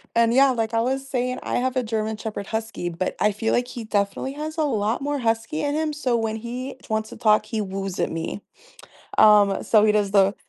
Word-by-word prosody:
And, 230 0 +4
yeah, 270 +1 +5
like 225 -2 -2
I 225 - +2
was 265 +3 -1
saying, 255 -1 -2
I - - -2
have 255 +1 0
a 255 - +1
German 220 -1 -2
shepherd 215 -2 -6
husky, 220 -5 -3
but 175 +2 -3
I 210 - +2
feel 225 +2 -1
like 245 0 +1
he 245 -2 -7
definitely 205 +4 -1
has 310 +2 -6
a 315 - +2
lot 220 -4 0
more 290 +1 -1
husky 230 +6 -1
in 290 0 -1
him, 310 0 0
so 265 -5 0
when 220 -1 -2
he 250 +4 -6
wants 220 0 -1
to - - -10
talk, 215 -1 +3
he 225 - -3
woos 195 -1 -4
at - - +1
me. 165 +5 -4 0.8
Um, 205 -2 +6
so 215 -2 +4
he 215 - +4
does 205 -2 +1
the 200 0 +4
225 Hz, 230 wpm, -23 LUFS, 210-255 Hz, 0.8 s, Um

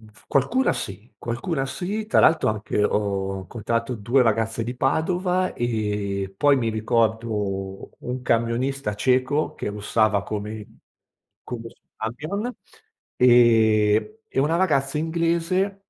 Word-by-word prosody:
F 110 -1 -19
qualcuna 235 - +2
sì, 100 +4 -6
qualcuna 135 +5 -2
sì, 200 +10 -4
tra - - +2
l'altro 160 -6 +4
anche 105 -1 -1
ho 100 -2 0
incontrato 115 +4 -3
2 120 +4 +2
ragazze 115 0 0
di 125 +2 -4
Padova, 180 +8 0
ehm, 105 -4 -2
poi 145 +2 +4
mi 115 -3 0
ricordo 110 -4 -1
un 125 +1 -4
camionista 115 +1 0
ceco, 130 +6 +1
che - - -4
russava 105 0 +1
come 105 0 -5 0.8
come 115 -2 -6
il - - -17
suo - - -43
camion, 155 - -4 0.6
ehm, 115 - +4 0.2
e 135 - +3
una 160 +4 +2
ragazza 150 -5 +1
inglese 170 +4 0
115 Hz, 125 wpm, -24 LUFS, 105-145 Hz, 0.8 s, l'altro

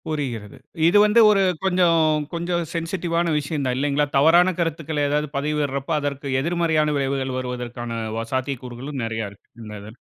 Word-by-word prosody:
புரிகிறது. 125 -9 -4 0.3
இது 185 +5 +5
வந்து 210 +2 +4
ஒரு 200 -2 +3 0.2
கொஞ்சம், 165 -5 +3
கொஞ்சம் 170 0 -1
சென்சிடிவான 170 0 -1
விஷயம் 145 -1 -3
தான் 125 -1 0
இல்லைங்களா? 145 +1 +1
தவறான 170 +6 +5
கருத்துக்கள 160 -3 -1
ஏதாவது 150 +1 0
பதவிடுறப்போ, 145 0 -1
அதற்கு 140 -1 -4
எதிர்மறையான 160 -2 +1
விளைவுகள் 135 -1 -1
வருவதற்கான 125 -1 -5 0.3
வ 115 - -3
சாத்திய 130 +1 -1
கூறுகளும் 130 +3 -6
நிறைய 110 -2 -3
இருக்கு. 100 - -21
இந்த 105 -1 -8
இதுல. 110 +4 -12
145 Hz, 150 wpm, -22 LUFS, 130-165 Hz, 0.3 s, இது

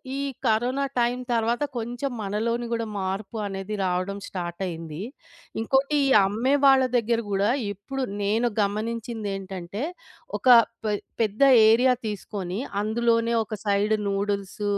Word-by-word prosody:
ఈ - - -3 0.3
corona 245 +5 +1
time 240 +1 +1
తర్వాత 235 +3 +1
కొంచెం 245 +4 -3
మనలోని 225 +4 -1
గూడా 230 -1 -1
మార్పు 195 +3 -3
అనేది 195 +1 -4
రావడం 185 +2 -1
స్టార్ట్ 175 -1 -5
అయ్యింది. 165 -3 -6 0.6
ఇంకోటి 270 +6 +1
ఈ - - +2 0.2
అమ్మే 225 +7 +1
వాళ్ళ 270 -1 +6
దగ్గర 230 0 +1
గూడా 200 +1 +1 0.2
ఇప్పుడు 235 +8 -6 0.2
నేను 220 +4 +2
గమనించిందేంటంటే 205 -2 -3 0.5
ఒక - - -5 0.4
పె 210 - +1 0.3
పెద్ద 215 +2 -1 0.3
ఏరియా 250 +3 +5
తీసుకొని 200 -2 -4 0.2
అందులోనే 230 +2 +1
ఒక 220 0 -6
సైడ్ 205 +1 +2
నూడిల్స్ 200 0 -2
215 Hz, 120 wpm, -25 LUFS, 195-235 Hz, 0.6 s, వాళ్ళ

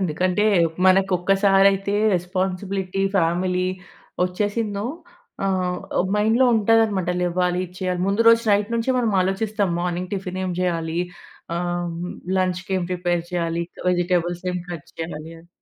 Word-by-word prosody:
ఎందుకంటే, 185 +3 0 0.4
మనకు 190 +1 +4
ఒక్కసారైతే 195 +1 +3 0.2
responsibility, 185 +1 -2 0.2
family 180 +2 +1 0.6
వొచ్చేసిందో 205 +2 -2 0.6
ఆహ్, 185 -2 0 0.4
మైండ్‌లో 220 +5 +3
ఉంటదనమాట, 215 -4 +3
లెవ్వాలి, 180 0 0
ఇచ్చెయ్యాలి. 180 0 -3
ముందు 200 +3 +1
రోజు 230 0 +6
నైట్ 205 +2 +2
నుంచే 230 +3 0
మనమాలోచిస్తాం. 200 -1 +1
మోనింగ్ 180 +1 -3
టిఫినేం 185 -1 -3
జెయ్యాలీ, 170 -2 -1 0.6
ఆహ్, 175 0 -2 0.5
లంచ్‌‌కేం 185 0 -1
ప్రిపేర్ 175 -1 0
చెయ్యాలి, 170 -1 -1 0.3
వెజిటెబుల్స్ 175 -1 0
ఏం 180 - -2
కట్ 170 -4 -7
చెయ్యాలి 160 -1 -6
అన్ 170 - -21
185 Hz, 110 wpm, -22 LUFS, 175-200 Hz, 0.6 s, రోజు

